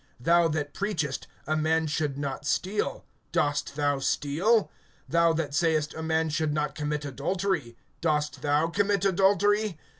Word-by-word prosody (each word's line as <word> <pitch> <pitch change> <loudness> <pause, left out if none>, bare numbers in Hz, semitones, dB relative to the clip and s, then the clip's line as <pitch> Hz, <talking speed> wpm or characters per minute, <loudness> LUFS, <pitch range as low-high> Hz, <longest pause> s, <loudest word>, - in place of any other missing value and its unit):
Thou 170 +6 +4
that 145 -2 -2
preachest, 165 -10 -2 0.2
a 155 - 0
man 160 +1 +1
should 150 -2 -1
not 140 -1 -4
steal, 205 - -1 0.3
dost 145 -1 0
thou 145 -1 +1
steal? 170 - +1 0.4
(22)Thou 170 -1 +4
that 155 -3 -2
sayest, 155 -1 +1
a 160 - -6
man 160 0 0
should 155 -1 0
not 150 -2 -1
commit 150 0 -3
adultery, 145 -2 -2 0.2
dost 150 -2 0
thou 145 +2 +2
commit 200 +2 +1
adultery? 200 +1 +3
155 Hz, 145 wpm, -27 LUFS, 145-180 Hz, 0.4 s, Thou